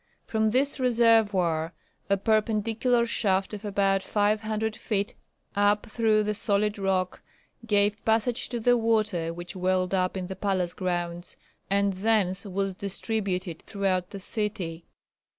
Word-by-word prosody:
From 220 -1 +1
this 270 +5 +1
reservoir 210 -9 +3 0.4
a 200 - +3
perpendicular 220 +3 +1
shaft 195 -4 0
of 210 0 -6
about 195 -1 +1
500 215 +2 0
feet 205 -3 -2 0.4
up 205 +1 +3
through 215 -1 +2
the 210 0 -1
solid 210 0 +1
rock 190 -2 -1 0.5
gave 205 -1 +2
passage 225 +2 +1
to 240 - -3
the 245 +2 +4
water 215 -7 +1
which 175 +2 -7
welled 185 0 0
up 185 0 0
in 185 - -3
the 190 +1 -6
palace 185 -2 -1
grounds, 175 -1 -3 0.3
and 200 0 +2
thence 195 -1 +1
was 195 0 -2
distributed 190 -3 -3
throughout 190 -3 -1
the 200 - -7
city. 190 -5 -3
200 Hz, 135 wpm, -27 LUFS, 185-220 Hz, 0.5 s, the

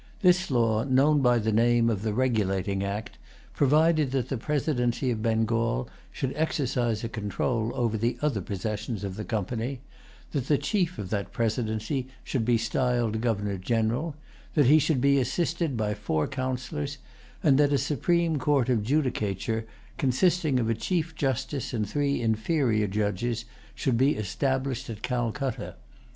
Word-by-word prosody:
This 180 0 +4
law, 115 -4 +2
known 140 +3 +3
by 125 -2 +4
the 110 -1 0
name 115 +1 +3
of 110 -4 0
the 110 0 -1
Regulating 100 -5 0
Act, 100 +2 -4 0.3
provided 155 +1 +3
that 130 -4 -1
the 135 - -1
presidency 130 -3 0
of 110 -2 -2
Bengal 115 - +1 0.2
should 135 -1 -3
exercise 125 -7 0
a - - -1
control 110 +2 -2
over 115 -3 0
the 115 +3 0
other 140 -9 0
possessions 105 +2 -4
of 95 -2 -4
the 105 - -5
Company; 120 +4 -3 0.5
that 135 -4 -2
the 145 - +4
chief 185 -2 0
of 95 -3 -6
that 100 -2 -2
presidency 115 +3 -1 0.2
should 130 -5 -1
be 120 +1 +3
styled 115 -1 0
Governor 105 -4 -1
General; 115 - 0 0.4
that 145 - +5
he 150 +5 +7
should 150 -3 +1
be 140 +1 +4
assisted 160 +2 -1
by 105 -1 0
four 85 -7 -1
Councillors; 130 - -3 0.5
and 140 -2 +5
that 145 -1 +4
a 140 - +4
supreme 165 +3 +1
court 135 -2 +2
of 120 -4 +2
judicature, 110 - -1 0.3
consisting 155 0 +2
of 115 - 0
a 115 - +2
chief 165 - -1
justice 135 -2 -2
and 105 -2 -1
three 140 0 0
inferior 110 -1 +1
judges, 105 +4 -1 0.3
should 130 -6 0
be 135 +3 +4
established 130 +5 -1
at 110 -1 -7
Calcutta. 125 +1 -2
120 Hz, 155 wpm, -27 LUFS, 110-140 Hz, 0.5 s, he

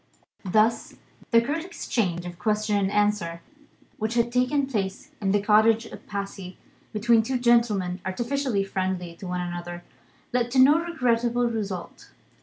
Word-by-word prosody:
Thus, 215 +5 +2 0.3
the 230 -1 +5
curt 295 +6 -2
exchange 190 - -2
of 175 -1 -8
question 215 -1 0
and 195 -1 +1
answer, 205 -5 0 0.6
which 220 +2 -2
had 235 0 +2
taken 255 +3 +2
place 200 -7 -4
in 195 -1 +1
the 205 - +3
cottage 220 +2 +4
at - - -12
Passy, 195 -2 -6 0.3
between 225 +1 +3
two 255 +4 -1
gentlemen 220 -7 +2
artificially 240 +2 -1
friendly 185 -3 -3
to 190 - -8
one 180 0 -2
another, 175 0 -6 0.5
led 245 -1 +1
to 265 - +3
no 290 +5 +7
regrettable 245 -7 +1
result. 200 -6 -5
215 Hz, 145 wpm, -25 LUFS, 190-240 Hz, 0.6 s, no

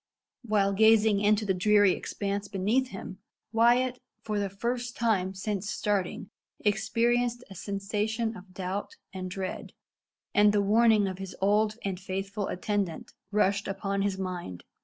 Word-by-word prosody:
While 205 -3 +2
gazing 220 0 +5
into 210 +1 +3
the 195 - +2
dreary 205 +1 +4
expanse 200 +2 -3
beneath 210 +7 +1
him, 195 -3 -8 0.3
Wyat 245 +2 +3 0.2
for 210 -1 -1
the 200 -1 -1
first 240 +5 -3
time 195 -5 +1
since 200 +1 -3
starting 200 -1 -2 0.3
experienced 240 +3 +1
a - - -6
sensation 210 +4 -2
of 185 -1 -12
doubt 190 - -4 0.2
and 185 -1 -5
dread; 185 0 -5 0.6
and 205 0 +5
the 205 - +3
warning 215 0 +4
of 185 0 -5
his 195 -1 -7
old 210 +2 +2
and 190 -2 -3
faithful 195 +2 -3
attendant 195 -3 -2 0.2
rushed 205 -1 +2
upon 195 0 -2
his 195 -1 0
mind. 180 - -5
205 Hz, 140 wpm, -28 LUFS, 195-220 Hz, 0.6 s, gazing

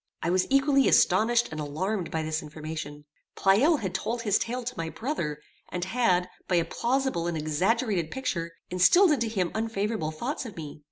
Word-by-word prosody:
I 170 - +1
was 185 0 +2
equally 275 0 +4
astonished 225 +6 +4
and 155 -1 -4
alarmed 180 +6 -2
by 160 -1 -2
this 155 0 -2
information. 150 -1 -7 0.3
Pleyel 245 - +4
had 190 -3 -3
told 235 +1 -2
his 210 -3 +2
tale 245 +2 -3
to 245 +1 -4
my 165 -4 -3
brother, 165 - -3 0.3
and 180 0 -3
had, 190 -4 +2 0.2
by 180 - +1
a 170 -1 +3
plausible 245 -3 -1
and 170 -2 -2
exaggerated 175 +4 0
picture, 170 -10 -3 0.2
instilled 310 - +5
into 240 -6 +1
him 190 -6 -1
unfavorable 220 -5 -2
thoughts 235 - -4
of 225 -8 -9
me. 150 -2 -7
190 Hz, 175 wpm, -27 LUFS, 160-235 Hz, 0.3 s, instilled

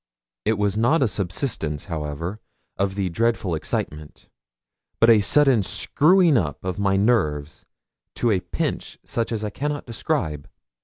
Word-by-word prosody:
It 110 0 +2
was 100 -1 0
not 130 +7 +3
a - - +3
subsidence, 90 - -2
however, 85 +4 -4 0.4
of 95 0 -1
the 100 -2 -1
dreadful 110 -1 0
excitement, 75 -1 -4 0.7
but 115 +1 +7
a 110 -2 +6
sudden 135 +2 +4
screwing 165 - +3
up 75 +1 -4
of 95 0 -3
my 95 -1 +2
nerves 80 -10 0 0.5
to 120 - +1
a 95 - +2
pitch - - -4
such 115 0 -2
as 110 -2 -2
I 105 - -3
cannot 145 +5 -3
describe. 110 - -3
100 Hz, 145 wpm, -23 LUFS, 85-120 Hz, 0.7 s, but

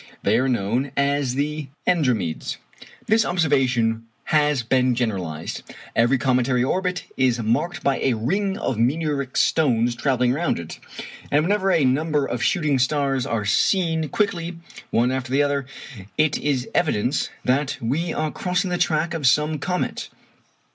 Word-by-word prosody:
They 110 +4 +3
are 130 +1 +1
known 120 +4 0
as 140 -2 +1
the 150 +1 -2 0.2
Andromedes. 125 - 0 0.5
This 220 +1 +3
observation 130 - +1 0.2
has 150 -4 +2
been 125 +1 +2
generalized. 95 -10 -3 0.3
Every 120 +4 +3
cometary 125 -1 +1
orbit 180 +6 -1
is 125 -2 +2
marked 170 +11 -1
by 140 -1 +1
a 130 - +1
ring 195 - -1
of 120 -4 -2
meteoric 140 +1 0
stones 120 -6 +2
travelling 125 0 +1
round 170 +5 0
it, 85 -1 -8 0.5
and 145 +1 +3
whenever 195 +2 +1
a 155 -6 +3
number 145 +2 +1
of 120 -2 -3
shooting 155 -7 +1
stars 135 -1 +1
are 110 -3 -1
seen 160 - +1
quickly 180 -6 -1 0.3
one 120 +2 +2
after 130 -1 -3
the 140 +2 +3
other, 140 -2 -1 0.5
it 155 -1 +3
is 140 -4 0
an - - -15
evidence 140 -7 +1 0.2
that 135 +2 +1
we 150 +9 -1
are 155 -1 -2
crossing 180 +1 -1
the 175 - -1
track 165 -1 +1
of 155 -5 0
some 150 +4 +2
comet. 180 +5 -2
140 Hz, 150 wpm, -23 LUFS, 125-160 Hz, 0.5 s, They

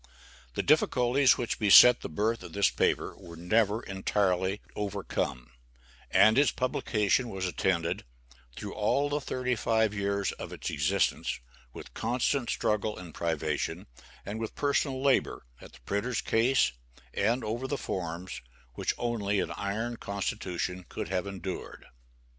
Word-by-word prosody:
The - - 0
difficulties 135 -3 +4
which 120 - -2
beset 115 +3 +8
the - - -5
birth 110 +8 0
of - - -10
this 100 0 +3
paper - - 0
were 85 -3 -12
never 105 +5 +1
entirely 95 0 0 0.2
overcome, 95 -11 -3 0.6
and 110 +4 +5
its 145 - +5
publication 120 -1 0
was 95 -3 -3
attended, 90 -2 0 0.5
through 105 - -6
all 140 +7 +1
the 145 +1 -1
thirty 125 -1 -1
five 110 -2 +1
years 100 -1 -1
of - - -8
its - - -4
existence, 90 +7 0 0.3
with - - -11
constant 125 +1 0
struggle 105 0 0
and 90 -3 -10
privation, 80 -3 -2 0.4
and 105 +2 -5
with 110 -1 -5
personal 140 -2 0
labor, 135 - +1 0.2
at - - -13
the - - -16
printer's 105 - -1
case, 120 - +3 0.4
and 115 +5 +1
over 115 +4 -3
the 145 - -2
forms, 90 -3 -5 0.3
which - - -1
only 105 -4 -1
an - - -2
iron 110 +4 -3
constitution 95 -3 -3
could - - -5
have 95 0 -1
endured. 95 -1 -6
105 Hz, 140 wpm, -29 LUFS, 95-120 Hz, 0.6 s, beset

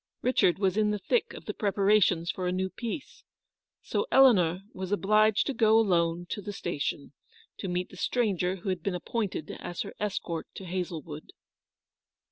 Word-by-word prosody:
Richard 245 -8 +3
was 195 0 +1
in 215 -1 +3
the 210 - 0
thick 455 - 0
of - - -10
the - - -3
preparations 200 -4 +2
for 185 -1 -3
a - - +1
new 190 +1 -1
piece, 245 +4 -6 0.6
so - - -2
poor 470 - 0
Eleanor 185 -10 +5
was 185 0 -5
obliged 215 +1 +3
to 275 - -1
go 220 -2 +4
alone 175 -5 +2
to 205 - -4
the 205 - -5
station, 150 -6 -3 0.4
to 195 - -5
meet 180 0 -2
the - - -13
stranger 190 -5 0
who 190 +1 -5
had 185 -3 -1
been 190 +1 -2
appointed 190 -4 -3
as 175 - -4
her - - -8
escort 180 -5 -3
to 190 - -8
Hazlewood. 170 -4 -5
190 Hz, 175 wpm, -28 LUFS, 175-215 Hz, 0.6 s, Eleanor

